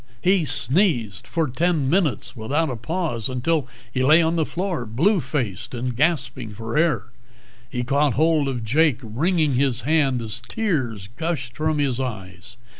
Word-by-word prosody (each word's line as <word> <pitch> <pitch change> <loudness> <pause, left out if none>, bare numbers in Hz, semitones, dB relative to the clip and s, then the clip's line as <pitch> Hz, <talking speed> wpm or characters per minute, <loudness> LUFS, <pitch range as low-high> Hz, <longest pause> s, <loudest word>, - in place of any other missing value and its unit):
He 185 -2 +2
sneezed 130 - +2
for 165 -2 0
ten 155 +1 0
minutes 160 -3 0
without 140 +7 -1
a - - -3
pause, 120 - -2
until 135 +3 0 0.3
he 130 - 0
lay 155 +5 +6
on 165 0 +2
the 160 -2 0
floor 180 -6 -2
blue 170 - +2
faced 130 - -3
and 120 0 -3
gasping 130 -6 0
for 115 +2 -5
air. 155 -7 +1 0.6
He 125 -1 -3
caught 140 +2 +2
hold 155 -1 +2
of 125 -4 -3
Jake, 145 +3 +3
wringing 150 - +1
his 130 -1 +1
hand 140 -4 +2
as 110 -1 -5
tears 130 - -2
gushed 150 -8 -3
from 155 +1 0
his 135 -4 0
eyes. 105 -4 -6
140 Hz, 160 wpm, -23 LUFS, 120-160 Hz, 0.6 s, lay